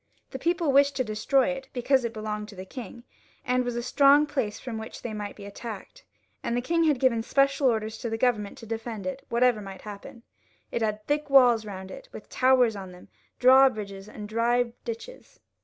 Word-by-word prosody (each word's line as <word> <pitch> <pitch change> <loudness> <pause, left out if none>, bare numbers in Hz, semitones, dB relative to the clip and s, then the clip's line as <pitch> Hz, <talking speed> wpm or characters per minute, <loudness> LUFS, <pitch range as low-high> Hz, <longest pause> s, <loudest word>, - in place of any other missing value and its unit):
The - - -6
people 340 -3 +1
wished 280 +1 +4
to 255 - +1
destroy 230 +5 +1
it, 270 0 -5
because 260 +1 +2
it 235 - -2
belonged 215 -1 -5
to 205 - -12
the 185 0 -8
king, 235 +2 -9 0.4
and 250 0 +1
was 245 -1 -3
a 240 - -2
strong 280 +3 +5
place 265 -8 -3
from 230 -4 -6
which 220 - -9
they 235 - -4
might 205 -1 -5
be 200 - -11
attacked; 220 - -9 0.4
and 235 - -2
the - - 0
king 330 +5 +1
had 295 -5 +2
given 245 -3 +2
special 275 +3 +2
orders 220 -2 -1
to 235 - -4
the 225 - -2
Government 225 -4 0
to 230 - -11
defend 225 -1 -5
it, 275 -1 -4
whatever 235 -2 +2
might 195 -2 -9
happen. 210 +3 -10 0.5
It - - -2
had 215 -1 -2
thick 295 0 -1
walls 245 -5 +6
round 190 -1 -7
it, - - -11
with - - -11
towers 255 -3 +3
on 190 -2 -8
them, 180 0 -15 0.3
drawbridges, 215 -7 +4
and 210 -1 -8
dry 235 +2 +1
ditches. 235 - -8
235 Hz, 205 wpm, -27 LUFS, 215-265 Hz, 0.5 s, walls